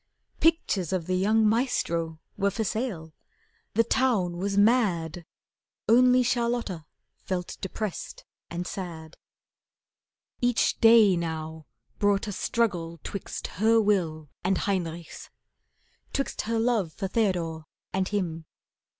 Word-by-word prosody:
Pictures 305 - +2
of 185 -3 -1
the 185 - -1
young 215 +4 +3
"Maestro" 170 -9 0 0.2
were 200 0 +1
for 220 +3 -2
sale. 205 -8 -3 0.6
The 230 - +5
town 225 -8 +1
was 200 +2 -2
mad. 185 -7 +2 0.6
Only 250 +2 +6
Charlotta 235 -9 -1 0.3
felt 180 -2 -4
depressed 195 +1 -5 0.2
and 175 +1 -4
sad. 165 -4 -6 1.3
Each 245 -1 +2
day 225 -4 +7
now 160 -2 -4 0.3
brought 205 0 +2
a - - -2
struggle 175 -6 -1
'twixt 200 - -5 0.2
her 225 +1 +5
will 175 -8 +1 0.2
And 185 +1 +2
Heinrich's. 170 -4 -3 0.8
'Twixt 275 - -1
her 230 - +1
love 225 -8 +1
for 195 - -3
Theodore 175 -7 -1 0.3
And 190 0 0
him. 170 -6 -2
195 Hz, 115 wpm, -27 LUFS, 170-225 Hz, 1.3 s, day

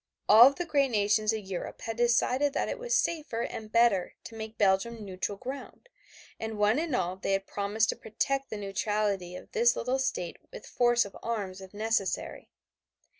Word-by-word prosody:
All 235 +5 +9
the 350 +5 -4
great 280 -4 +2
nations 210 -1 +2
of 220 -2 -4
Europe 190 -2 -6
had 225 - -4
decided 250 +4 +2
that - - 0
it - - -4
was 485 0 0
safer 300 -9 -1
and 215 -1 -6
better 230 -6 +3
to - - -10
make 220 0 -7
Belgium 205 +3 +1
neutral 195 +1 -4
ground, 270 - -8 0.5
and 220 -1 -4
one 210 +5 +3
and 320 -5 -1
all 180 -4 -1
they 195 - -1
had 195 0 0
promised 205 +3 0
to - - 0
protect 275 +5 -2
the 215 - -5
neutrality 200 -2 -1
of - - -11
this 235 0 +3
little 255 +2 -1
state 180 -9 -2
with - - -10
force 240 -1 +2
of 200 - -11
arms 200 -5 -4
if 190 -1 -11
necessary. 210 -2 -2
220 Hz, 180 wpm, -29 LUFS, 200-245 Hz, 0.5 s, All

